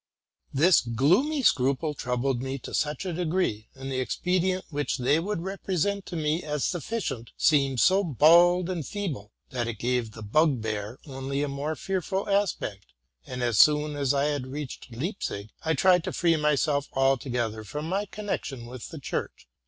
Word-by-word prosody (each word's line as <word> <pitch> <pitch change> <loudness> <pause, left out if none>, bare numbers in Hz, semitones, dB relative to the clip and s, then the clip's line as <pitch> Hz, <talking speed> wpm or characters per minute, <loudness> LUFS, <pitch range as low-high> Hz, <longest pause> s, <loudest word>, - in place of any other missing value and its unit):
This 170 +6 +5
gloomy 180 - +2
scruple 140 - +2
troubled 125 -1 -1
me 135 +1 -3
to - - -9
such 150 +4 -1
a 180 - -2
degree, 165 - -1
and 135 0 -6
the 130 - -1
expedient 185 +7 0
which 145 -1 -1
they 140 +4 +2
would 190 +1 -2
represent 195 +1 -2
to 175 - -6
me 155 +1 0
as 150 -3 -3
sufficient 160 - -3
seemed 140 -4 +3
so 190 +7 +4
bald 170 - +5
and 180 -4 -3
feeble, 145 - -5 0.2
that 120 -2 -2
it 115 -2 -4
gave 120 -1 -1
the 110 - -9
bugbear 110 -4 0
only 135 0 -3
a - - -1
more 140 +3 -3
fearful 190 +2 -2
aspect; 195 - -1 0.4
and, 125 0 -4
as 120 -4 +1
soon 150 0 +5
as 140 -2 -1
SI 140 +1 +3
had 140 -3 -3
reached 140 -2 -7
Leipzig, 115 - -4
I 160 0 +1
tried 180 -3 +4
to - - -3
free 170 -1 +3
myself 150 -1 +1
altogether 125 -4 0
from 150 +8 -5
my 195 +4 -1
connection 190 - -4
with 125 0 -8
the 160 - -8
church. 135 - -5
145 Hz, 170 wpm, -27 LUFS, 125-175 Hz, 0.4 s, This